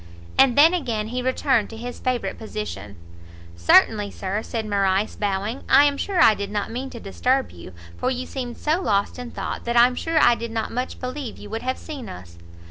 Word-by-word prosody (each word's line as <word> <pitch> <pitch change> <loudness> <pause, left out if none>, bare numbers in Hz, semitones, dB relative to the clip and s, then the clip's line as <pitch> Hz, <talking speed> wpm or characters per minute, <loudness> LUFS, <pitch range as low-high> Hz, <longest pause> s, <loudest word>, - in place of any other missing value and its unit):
And 270 -2 +4
then 320 +4 +7
again 230 -11 -2
he 250 +2 -2
returned 260 -3 +1
to 225 - -9
his 245 +2 -7
favourite 255 -2 -2
position. 210 - -6 0.6
"Certainly, 200 - +4
Sir," 195 +2 -3
said 225 -1 -4
Morrice, 200 0 +1
bowing; 205 +4 -2
"I 285 - +7
am 285 -1 +2
sure 370 +6 -2
I 225 - +7
did 200 -1 -5
not 205 +1 -3
mean 260 +3 -4
to 240 - -9
disturb 255 +7 0
you; 85 +1 -11 0.3
for 255 - 0
you 255 0 -3
seemed 245 -3 -6
so 315 +4 0
lost 200 - 0
in 245 -1 -6
thought, - - -5
that 235 0 0
I'm 245 +1 +6
sure 325 +5 -2
I - - +6
did 235 0 -4
not 225 -1 -3
much 250 +2 -4
believe 255 -1 -5
you 205 - -11
would 225 +1 -3
have 260 +1 -2
seen 280 -8 -8
us." 85 -1 -11
235 Hz, 210 wpm, -23 LUFS, 205-260 Hz, 0.6 s, then